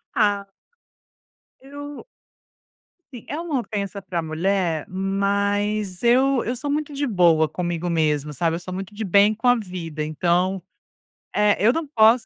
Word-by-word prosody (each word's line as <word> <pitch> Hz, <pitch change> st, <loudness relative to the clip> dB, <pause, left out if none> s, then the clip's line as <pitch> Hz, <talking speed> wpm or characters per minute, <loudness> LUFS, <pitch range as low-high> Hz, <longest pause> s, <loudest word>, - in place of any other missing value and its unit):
Ah 205 Hz, -3 st, +2 dB, 1.2 s
Eu 285 Hz, -, -9 dB, 1.1 s
Sim, 235 Hz, -, -10 dB
é 300 Hz, -, -3 dB
uma 320 Hz, -6 st, -1 dB
ofensa 200 Hz, -3 st, -4 dB
para 170 Hz, -3 st, -3 dB
mulher, 165 Hz, 0 st, -1 dB
mas 200 Hz, +1 st, -1 dB
eu 255 Hz, +2 st, +3 dB
eu 245 Hz, -, -2 dB
sou 265 Hz, +4 st, -6 dB
muito 300 Hz, 0 st, -2 dB
de 285 Hz, +1 st, -1 dB
boa 170 Hz, -, +4 dB
comigo 175 Hz, +1 st, -3 dB
mesma, 150 Hz, -3 st, 0 dB
sabe, 165 Hz, +1 st, 0 dB
eu -, -, -4 dB
sou 180 Hz, +1 st, -7 dB
muito 195 Hz, +2 st, -5 dB
de 215 Hz, +1 st, -5 dB
bem 200 Hz, +3 st, +4 dB
com 225 Hz, +3 st, -2 dB
a 245 Hz, -, +7 dB
vida, 175 Hz, -7 st, -5 dB
então, 175 Hz, +4 st, 0 dB, 0.7 s
eh, 210 Hz, 0 st, +3 dB
eu 230 Hz, -, +6 dB
não 325 Hz, +2 st, -2 dB
posso 230 Hz, -2 st, +4 dB
200 Hz, 150 wpm, -23 LUFS, 175-235 Hz, 1.2 s, a